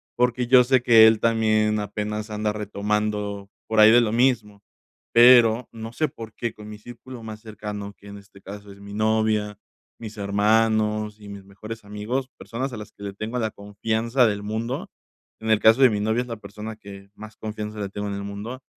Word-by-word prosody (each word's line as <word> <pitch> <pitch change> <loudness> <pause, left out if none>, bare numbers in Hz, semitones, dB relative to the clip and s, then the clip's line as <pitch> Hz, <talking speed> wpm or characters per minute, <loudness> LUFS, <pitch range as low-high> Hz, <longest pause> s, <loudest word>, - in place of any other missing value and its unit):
porque 125 0 +1
yo 125 0 +7
sé 130 0 +2
que 115 -3 +7
él 110 -1 +3
también 110 -2 +2
apenas 105 +1 -4
anda 105 0 -1
retomando 105 -1 -3 0.2
por 110 -1 0
ahí 110 +1 +8
de 120 +1 +6
lo 110 -2 0
mismo, 110 -4 0 0.5
pero 120 -1 +6
no 115 0 -8
sé 155 +4 0
por 115 -5 -10
qué 120 -2 -4
con 105 0 -12
mi 105 - -9
círculo 120 +2 -11
más 110 -1 -8
cercano, 105 -2 -7
que 100 - -17
en 100 0 -9
este 100 -1 -17
caso 100 +1 -10
es 100 - -14
mi 100 0 -11
novia, 110 -1 0 0.4
mis 110 -2 -8
hermanos 105 +1 +1
y 105 - -13
mis 100 -1 -9
mejores 110 +3 -10
amigos, 110 +6 -4
personas 130 +4 -5
a 120 - -7
las 105 -1 -9
que 100 - -13
le 100 -1 -5
tengo 110 +5 -5
la 110 -2 -1
confianza 110 +5 0
del 105 -1 -2
mundo. 110 +4 -4 0.5
En 110 - -4
el 110 - +4
caso 110 +5 +5
de 130 - +8
mi 105 -2 -1
novia, 110 +3 0
es 125 - -7
la 115 -2 -6
persona 105 +1 -8
que 100 -2 -12
más 110 0 -11
confianza 105 0 -6
le 100 - -3
tengo 105 +1 -5
en 100 - -4
el 100 0 -5
mundo, 105 +6 -7
110 Hz, 205 wpm, -23 LUFS, 105-115 Hz, 0.5 s, ahí